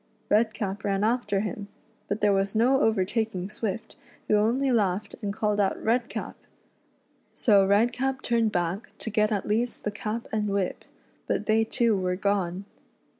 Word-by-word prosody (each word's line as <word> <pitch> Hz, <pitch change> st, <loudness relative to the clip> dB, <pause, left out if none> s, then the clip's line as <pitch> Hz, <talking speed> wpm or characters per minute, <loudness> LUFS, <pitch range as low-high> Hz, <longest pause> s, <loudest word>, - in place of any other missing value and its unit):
Redcap 210 Hz, -2 st, +1 dB
ran 200 Hz, 0 st, 0 dB
after 215 Hz, -3 st, +1 dB
him, 205 Hz, 0 st, -4 dB, 0.4 s
but 205 Hz, +2 st, -2 dB
there 205 Hz, -1 st, +4 dB
was 195 Hz, +1 st, 0 dB
no 255 Hz, +5 st, +4 dB
overtaking 210 Hz, -2 st, 0 dB
Swift, 215 Hz, -1 st, -4 dB, 0.3 s
who 215 Hz, -, +3 dB
only 240 Hz, +6 st, +2 dB
laughed 205 Hz, -3 st, 0 dB
and 205 Hz, -2 st, -2 dB
called 210 Hz, 0 st, 0 dB
out 195 Hz, -2 st, +1 dB
"Redcap!" 235 Hz, +2 st, -1 dB, 1.0 s
So 205 Hz, -4 st, +4 dB
Redcap 245 Hz, +6 st, +1 dB
turned 230 Hz, -2 st, +2 dB
back 175 Hz, +2 st, -2 dB
to 225 Hz, -, -5 dB
get 215 Hz, 0 st, +2 dB
at 205 Hz, -2 st, -1 dB
least 230 Hz, +4 st, -1 dB
the 210 Hz, -, -1 dB
cap 215 Hz, +2 st, -4 dB
and 210 Hz, -1 st, 0 dB
whip, 195 Hz, -2 st, -2 dB, 0.4 s
but -, -, -1 dB
they 220 Hz, +1 st, +3 dB
too 230 Hz, 0 st, +1 dB
were 180 Hz, -1 st, 0 dB
gone. 195 Hz, -1 st, -1 dB
210 Hz, 155 wpm, -27 LUFS, 200-225 Hz, 1.0 s, there